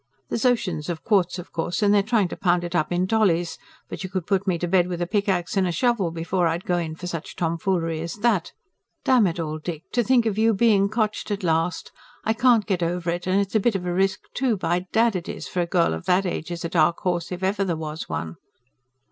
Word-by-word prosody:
THERE'S 230 - -1
OCEANS 180 -11 0
OF 165 -2 -4
QUARTZ, 190 -4 +2
OF 180 - -9
COURSE, 170 +5 -2
AND 205 0 +4
THEY'RE 205 - +5
TRYING 215 -2 +1
TO - - -5
POUND 175 -1 +1
IT 175 0 -5
UP 175 -2 0
IN 175 +1 +1
DOLLIES, 185 -5 +1 0.3
BUT - - -6
YOU 185 - -4
COULD 185 -3 -3
PUT 195 -1 0
ME 180 -2 +2
TO 175 - -2
BED 180 0 +3
WITH 175 -1 -4
A - - 0
PICK 205 +3 0
AXE 180 +1 0
AND 190 -1 +3
A - - 0
SHOVEL 210 0 +1
BEFORE 170 +2 0
I'D 165 +2 -1
GO 175 - +1
IN 160 -2 -4
FOR 180 - -9
SUCH 170 -3 -5
TOMFOOLERY 165 -1 -1
AS 170 0 -5
THAT. 205 -5 +1 0.5
DAMN 245 -6 +5
IT 170 0 -3
ALL, 155 -1 -3
DICK, 160 0 -5
TO 245 - +2
THINK 245 0 +3
OF 215 -2 -1
YOU 225 0 +4
BEING 200 -2 +4
COTCHED 215 -1 -1
AT 205 -1 -3
LAST. 165 0 0 0.3
I 220 - +2
CAN'T 235 -2 +4
GET 190 -4 -1
OVER 170 0 -1
IT, 175 +1 -4
AND 190 +2 +3
IT'S 195 - -4
A 220 - +4
BIT 220 +1 +1
OF 180 -2 -2
A 175 - -1
RISK, 190 +2 +1
TOO, 245 -4 +1
BY 180 0 -1
DAD 230 -1 +3
IT 175 - -7
IS, - - -6
FOR 180 - -1
A 170 - -1
GIRL 170 - +2
OF 80 +1 -6
THAT 185 +2 +3
AGE 175 -2 -3
IS 170 -1 -5
A - - -2
DARK 170 0 +3
HORSE 175 -3 -1
IF 180 +1 -5
EVER 195 +1 +1
THERE 175 -4 -1
WAS 155 0 -6
ONE. 80 0 -4
180 Hz, 255 wpm, -24 LUFS, 170-205 Hz, 0.5 s, THEY'RE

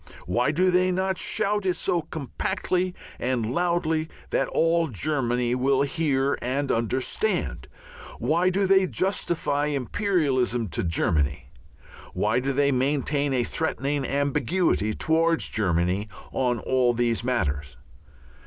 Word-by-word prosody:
Why 120 +10 +1
do 180 +5 +2
they 185 +1 +3
not 190 0 -1
shout 205 0 0
it 185 -2 +1
so 175 - 0
compactly 180 +4 -2 0.2
and 120 -2 -1
loudly 160 -2 0 0.2
that - - +1
all 165 0 +2
Germany 125 - 0
will 135 +2 +2
hear 140 -2 0
and 135 +3 -1
understand? 115 - -1 0.5
Why 165 +9 +2
do 195 +2 +1
they 190 0 +4
justify 170 -6 0
imperialism 135 - 0
to - - -2
Germany? 75 -6 0 0.6
Why 105 +3 +1
do 135 +2 -1
they 140 +1 +2
maintain 140 +2 0
a 125 -2 +1
threatening 145 0 -2
ambiguity 140 - 0
towards 165 +1 +1
Germany 90 0 0 0.2
on 125 -2 0
all 125 +1 +1
these 120 -1 0
matters? 75 - -2
140 Hz, 120 wpm, -25 LUFS, 120-170 Hz, 0.6 s, they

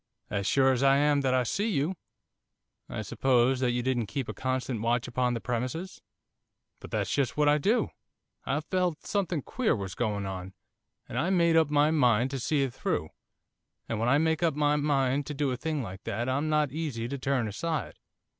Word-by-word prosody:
'As 100 -1 -1
sure 135 -1 +4
as 130 -1 0
I 135 0 +5
am 145 0 +3
that 130 -1 +2
I 130 - +3
see 200 - -1
you.' 170 0 0 0.9
'I 110 - -4
suppose 125 +3 +2
that 130 -1 +1
you 120 0 -1
didn't 120 -4 0
keep 135 +1 -3
a - - -4
constant 130 -3 -2
watch 120 +1 0
upon 125 0 0
the - - -2
premises?' 125 +10 -4 0.8
'But - - -10
that's - - -1
just 140 -2 0
what 150 0 +3
I 150 +1 +4
did 170 - 0
do. 230 0 +2 0.5
I 140 +3 -1
felt 180 0 -1
something 180 -8 -1
queer 255 -4 0
was 95 -3 -5
going 105 -3 -2
on, 95 0 -6 0.5
and - - -3
I 170 - +1
made 170 -3 +3
up 160 -2 +4
my 150 +1 +3
mind 125 -4 +3
to 135 - -3
see 140 +3 +1
it 130 -3 -2
through. 80 - -2 0.8
And 115 - -2
when 115 +2 +1
I 140 - +5
make 160 +1 +1
up 165 -4 +2
my 150 0 +2
mind 140 -2 +1
to 145 -2 -1
a - - -1
thing 150 +1 -2
like 95 -2 -8
that 120 +2 -2
I'm 140 +4 0
not 150 -3 +2
easy 140 -7 -3
to 140 +2 -4
turn 130 -3 0
aside. 160 +10 -3
135 Hz, 205 wpm, -28 LUFS, 120-150 Hz, 0.9 s, I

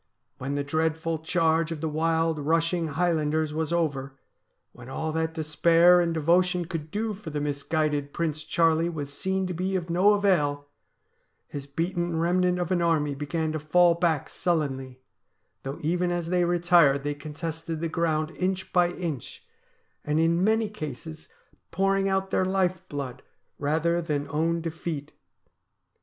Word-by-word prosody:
When 135 +2 -3
the 145 - -1
dreadful 160 +2 -1
charge 165 0 +1
of 165 - -4
the 160 - -2
wild, 160 +1 +1
rushing 165 +3 +1
Highlanders 155 -1 0
was 160 0 -2
over, 140 -5 -1 0.5
when 120 +1 -12
all 160 +4 -3
that 160 0 -2
despair 170 +3 +5
and 170 -1 0
devotion 175 +3 +2
could 160 -1 -5
do 215 +4 -2
for 200 -3 -8
the 150 -1 -3
misguided 145 0 -1
Prince 155 -2 -2
Charlie 165 0 +2
was 145 -4 -5
seen 190 +4 -1
to 180 - -3
be 185 +3 -1
ol 175 - -4
no 185 +5 +4
avail, 150 -8 +1 0.8
his 140 -1 -7
beaten 170 +3 -2
remnant 180 +2 +2
of 175 0 -2
an 180 -2 +2
army 155 -4 +1
began 155 +3 -2
to 155 - -2
fall 170 +3 +4
back 165 -4 0
sullenly, 135 -7 -2 0.6
though 135 +2 -5
even 175 +3 0
as 175 -1 -2
they 180 -1 +2
retired 170 -5 +4
they 145 0 -1
contested 160 +2 -5
the 165 - -1
ground 160 -1 0
inch 190 0 -3
by 175 -1 +4
inch, 160 - -5 0.6
and 150 +1 0
in 165 +2 +2
many 220 +1 +2
cases 155 -4 -8 0.4
pouring 195 +2 +1
out 190 0 0
their - - +2
life 185 -1 +1
blooc 135 -3 -5 0.4
rather 160 +4 +1
than 150 -3 -2
own 165 +2 0
defeat. 160 -2 -5
165 Hz, 155 wpm, -26 LUFS, 150-175 Hz, 0.8 s, despair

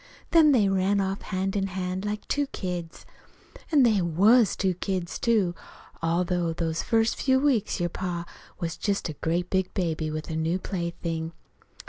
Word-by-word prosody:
Then 320 -3 +7
they 225 -7 +4
ran 195 +1 +2
off 195 0 -1
hand 190 +1 -2
in 195 -1 0
hand, 185 +1 -3
like 210 0 -4
two 285 -1 0
kids. 175 -7 -5 0.7
An' 290 -4 +6
they 215 -5 +4
was 200 +7 +4
two 190 -2 +1
kids, 180 -1 -3
too. 210 -7 +2 0.5
All 165 +2 +1
through 175 -2 -1
those 165 -1 -1
first 225 0 +1
few 260 -1 +3
weeks 260 -9 +1
your 175 0 0
pa 175 -1 -4 0.3
was 165 -1 -3
just 200 -4 -1
a - - -4
great 175 +2 -1
big 190 -1 +1
baby 160 -4 -1
with 155 +1 -5
a - - -2
new 160 +3 0
plaything. 170 -3 -4
185 Hz, 170 wpm, -26 LUFS, 170-205 Hz, 0.7 s, Then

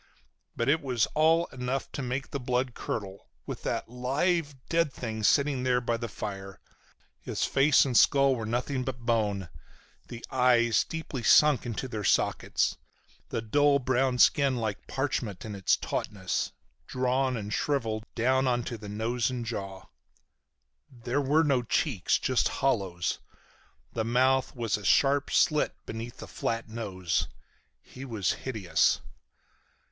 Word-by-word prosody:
But 115 - -1
it 155 +3 +3
was 125 -6 +1
all 160 +2 +4
enough 130 +1 -3
to - - -5
make 130 +2 -3
the 140 - -3
blood 125 0 -1
curdle, 100 -4 -6 0.2
with - - -6
that - - -2
live, 145 +6 -1
dead 165 -3 +1
thing 110 -4 -5
sitting 140 +5 +2
there 125 -1 +2
by 120 -1 -1
our 115 - -3
fire. 100 -2 -7 0.6
His - - -3
face 140 +1 +4
and 130 -3 -2
skull 135 +2 +5
were 115 -3 -4
nothing 125 +3 -1
but 125 -2 -5
bone, 105 -6 0 0.6
the 120 0 -8
eyes 120 -3 +3
deeply 160 -5 -5
sunk 145 0 +5
into 120 +3 -3
their 110 -4 -5
sockets, - - +1 0.5
the 115 - -3
dull 145 +5 +3
brown 130 -1 +1
skin 140 +1 +4
like 110 -4 -4
parchment 130 -8 -3
in 110 - -6
its 95 -2 +2
tautness, 95 -3 -3 0.4
drawn 130 0 0
and 105 0 -5
shriveled 115 -6 -1
down 130 +3 +2
onto 120 -1 -1
the 105 -1 -9
nose 110 +2 -1
and 125 -2 -4
jaw. 95 -4 -5 1.1
There 125 +1 -2
were 145 +4 +3
no 140 -5 +2
cheeks. 120 - +1
Just 130 -2 +1
hollows. 100 -10 -1 0.7
The 115 - -1
mouth 130 +3 +2
was 115 -4 -1
a 105 - -10
sharp 140 +7 +3
slit 155 -3 +2
beneath 115 +1 -7
the - - -9
flat 115 0 -3
nose. 95 -7 -2 0.6
He 130 - -11
was 110 -8 -1
hideous. 110 -9 +1
125 Hz, 145 wpm, -28 LUFS, 110-135 Hz, 1.1 s, skull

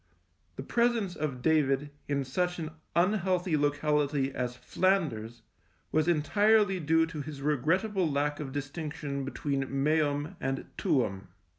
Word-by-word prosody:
The 135 - -6
presence 235 - +1
of 135 -5 -3
David 145 -2 +2 0.2
in 140 -1 0
such 180 +7 -1
an 160 -2 -4 0.2
unhealthy 185 -2 +2
locality 145 -1 +1
as 125 -1 -2
Flanders 120 - 0 0.5
was 155 +1 +2
entirely 205 +5 +3
due 160 +1 +3
to 160 -2 -6
his 145 -1 -7
regrettable 165 - +1
lack 145 +1 0
of 140 -3 -5
distinction 145 0 -4
between 135 0 -2
meum 145 +1 0
and 135 0 -2
tuum. 120 - 0
150 Hz, 125 wpm, -30 LUFS, 140-175 Hz, 0.5 s, entirely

